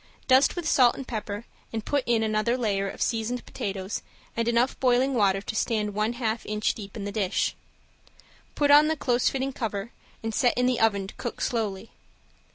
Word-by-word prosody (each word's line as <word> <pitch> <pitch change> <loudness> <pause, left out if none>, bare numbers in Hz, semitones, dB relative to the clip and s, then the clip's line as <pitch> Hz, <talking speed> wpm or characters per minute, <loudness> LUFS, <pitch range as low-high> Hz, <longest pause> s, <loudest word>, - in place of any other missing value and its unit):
Dust 260 +1 +5
with 345 -3 -3
salt 250 -6 +5
and 270 - -7
pepper 210 -1 -4 0.3
and 225 -1 -4
put 285 -2 +1
in 230 -2 +2
another 220 +3 +1
layer 200 -5 0
of - - -2
seasoned 235 +2 -2
potatoes 195 0 -4 0.3
and 230 0 0
enough 235 +2 +2
boiling 255 +1 +3
water 195 -5 +2
to 215 - -5
stand 215 -2 0
one 215 +3 0
half 230 -2 -2
inch 210 0 0
deep 200 0 -9
in 200 - -5
the 205 - -3
dish. 200 -2 0 1.0
Put 290 -1 +3
on 295 +1 +8
the 315 0 0
close 245 -3 +2
fitting 270 0 -2
cover 220 -3 -4 0.3
and 225 0 -2
set 245 +2 +2
in 250 - +3
the 250 -1 +1
oven 200 -3 +2
to 195 - -9
cook 240 - -5
slowly. 215 -3 -2
225 Hz, 190 wpm, -26 LUFS, 210-250 Hz, 1.0 s, on